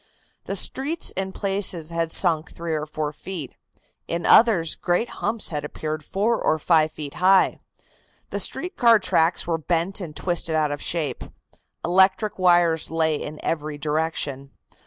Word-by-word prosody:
The - - -3
streets 300 +5 -1
in 190 0 -3
places 195 -5 -1
had 165 -1 -1
sunk 160 -1 +1
three 165 -1 -5
or 155 0 -2
four 150 0 -3
feet, 165 -3 -7 0.5
in 170 0 -3
others 200 -9 +5
great 180 +7 -1
humps 225 -1 -1
had 150 -3 -3
appeared 155 +1 -5
four 220 +7 0
or 155 - +2
five 155 0 +3
feet 145 -3 -8
high. 190 +1 +3 0.7
The - - -2
street 360 - -2
car 235 -2 +6
tracks 170 -4 +1
were 165 -1 -1
bent 175 +5 -1
and 160 -4 -7
twisted 175 -2 0
out 155 -2 +1
of 145 - -4
shape. 165 -4 -2 0.6
Electric 190 +4 +3
wires 175 -3 +3
lay 160 -1 +1
in 150 +1 -5
every 155 -2 -2
direction. 150 -2 -2
165 Hz, 155 wpm, -23 LUFS, 155-190 Hz, 0.7 s, car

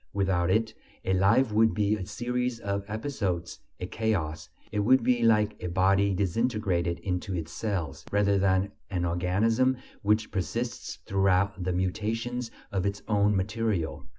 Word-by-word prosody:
Without 95 -3 +1
it, 110 +3 +1 0.3
a 95 - +1
life 105 +7 +4
would 110 +1 +3
be 105 0 +2
a 95 -4 -6
series 125 0 -2
of 100 -2 -2
episodes, 105 -7 -3 0.2
a 90 - -3
chaos; 90 -7 -2 0.2
it 105 - -1
would 120 +4 +4
be 125 0 +2
like 105 -2 +3
a 90 - -2
body 95 +3 +3
disintegrated 95 -3 0
into 90 +1 -2
its 85 -1 -4
cells, 90 -9 -3
rather 100 -1 +3
than 95 +1 +2 0.2
an 90 -3 -1
organism 105 +9 +2 0.2
which 105 +1 +1
persists 115 +5 -3
throughout 95 0 +2
the 90 - 0
mutations 115 +7 -2 0.2
of 95 -2 0
its 100 0 -2
own 105 -1 +3
material. 100 -3 -1
100 Hz, 150 wpm, -28 LUFS, 95-110 Hz, 0.3 s, life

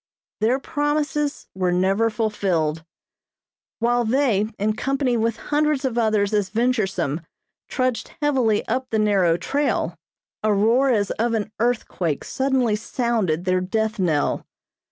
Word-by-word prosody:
Their 230 +5 +2
promises 295 0 -1
were 185 -1 0
never 195 +5 +2
fulfilled. 185 -8 -1 0.9
While 240 +1 +2
they, 230 -4 +2
in 210 +1 0
company 270 0 0
with 230 -1 0
hundreds 295 0 0
of 255 -3 -1
others 215 -3 +1
as 205 -2 +1
venturesome, 195 - 0 0.5
trudged 255 -4 -1
heavily 260 -8 +1
up 255 +3 -1
the 220 - 0
narrow 195 -6 +3
trail, 180 - -1 0.5
a 215 - +2
roar 230 +7 +3
as 205 -5 +1
of 230 0 +1
an 215 -1 -2
earthquake 215 - -1
suddenly 265 -5 +1
sounded 215 -7 -1
their 185 0 +2
death 220 +3 -1
knell. 160 -6 +1
220 Hz, 130 wpm, -23 LUFS, 195-255 Hz, 0.9 s, narrow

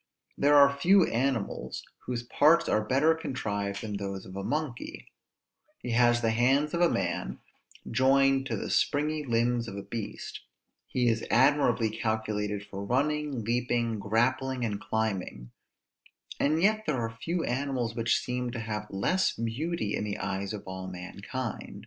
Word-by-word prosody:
There 145 +1 +4
are 140 -1 +7
few 180 +5 +5
animals 115 - -2 0.2
whose 120 -1 -2
parts 155 +7 +4
are 110 - +2
better 135 +8 +3
contrived 100 -10 -3
than 105 -2 -3
those 100 -1 -5
of 95 - -10
a 100 - -4
monkey: 145 -1 -4 0.7
he 125 - -5
has 120 0 +4
the 115 -1 +2
hands 135 +6 +2
of 170 - 0
a 175 - +5
man, 90 -2 -2 0.5
joined 135 +2 +3
to - - -2
the - - -4
springy 150 +1 +1
limbs 120 -1 +1
of 100 - -6
a 100 - -5
beast; 105 +1 -6 0.5
he 125 -1 0
is 115 -1 +1
admirably 130 -5 +3
calculated 105 -2 -2
for 100 -1 -7
running, 140 +2 0
leaping, 120 -1 0
grappling, 125 +4 0
and 105 -3 -2
climbing; 95 - -3 0.9
and 155 +4 +2
yet 215 +1 +3
there 150 - +1
are 115 -1 -3
few 170 +7 -2
animals 125 -2 -1
which 115 -1 +1
seem 125 0 -3
to 120 - -4
have 105 -1 -4
less 180 - +1
beauty 115 +1 -2
in - - -2
the 105 -1 -3
eyes 100 0 -3
of 105 -2 -6
all 95 0 -6
mankind. 100 +6 -6
120 Hz, 155 wpm, -29 LUFS, 105-140 Hz, 0.9 s, are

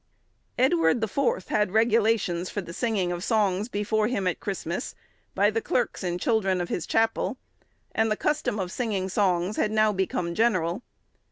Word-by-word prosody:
Edward 175 -7 +3
the 220 - 0
Fourth 240 -4 -1
had 210 -2 +2
regulations 220 -5 +2
for - - -3
the 170 -3 -7
singing 200 -5 0
of 175 0 -4
songs 210 -1 +1
before 210 0 0
him 210 -6 -1
at 180 - 0
Christmas, 190 -3 -4 0.4
by 205 +2 +3
the 225 +1 -1
clerks 240 -1 -1
and 175 -1 -2
children 195 -4 +1
of 175 - -3
his 170 - -3
chapel, 225 +4 +1 0.6
and 220 0 +2
the 215 - 0
custom 300 -8 0
of 185 -3 -3
singing 200 -6 -2
songs 185 0 +1
had 215 - +1
now 215 0 +3
become 180 -3 -1
general. 185 -4 +1
205 Hz, 170 wpm, -26 LUFS, 180-225 Hz, 0.6 s, Edward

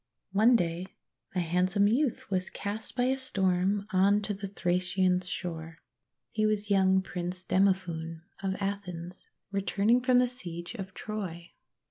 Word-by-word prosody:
One 220 +5 +5
day 175 -2 0 0.5
a - - +2
handsome 180 +4 +2
youth 240 -1 0
was 185 -1 0
cast 205 +2 -5
by 245 - +2
a 260 +1 +3
storm 195 -4 +1
on 200 +3 +4
to 205 +1 -1
the 200 0 -5
Thracian 180 -1 +1
shore. 165 -3 -5 0.5
He 215 - 0
was 210 -1 -1
young 190 -1 +4
Prince 180 0 -5
Demophoon 180 -4 0 0.2
of 190 -1 -1
Athens, 185 -3 -5 0.2
returning 205 +4 +2
from 250 0 +4
the 250 0 +5
siege 175 -8 -6
of 190 -5 -7
Troy. 180 -6 -5
190 Hz, 140 wpm, -30 LUFS, 180-205 Hz, 0.5 s, One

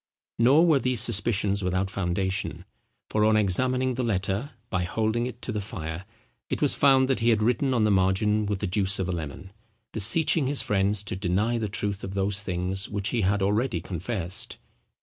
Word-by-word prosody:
Nor 135 +8 +5
were 155 -5 +4
these 125 -2 0
suspicions 100 -3 +1
without 95 +1 -1
foundation; 95 0 -2 0.4
for 105 - 0
on 110 0 +4
examining 125 +6 +1
the 125 +1 -2
letter, 100 +3 -1 0.2
by 90 -1 0
holding 110 +6 -1
it 120 -1 -10
to - - -3
the 105 -1 -3
fire, 80 -2 -6 0.4
it - - -2
was - - +2
found 135 -2 +4
that 135 - 0
he 115 +1 +2
had 110 -2 +2
written 125 +4 +1
on 120 -4 +2
the 105 - +3
margin 100 +3 +1
with 100 -2 -3
the - - -1
juice 100 +1 0
of 95 - -2
a - - -2
lemon, 85 +2 -6 0.4
beseeching 130 - +4
his 140 0 +1
friends 100 0 +1
to 100 - -4
deny 100 +6 0
the 110 - -2
truth 100 0 -2
of 95 0 -6
those 100 +1 0
things 95 +1 -3
which 100 +1 0
he 120 -2 -1
had 100 +1 +1
already 105 0 0
confessed. 90 +1 -4
105 Hz, 190 wpm, -26 LUFS, 95-120 Hz, 0.4 s, Nor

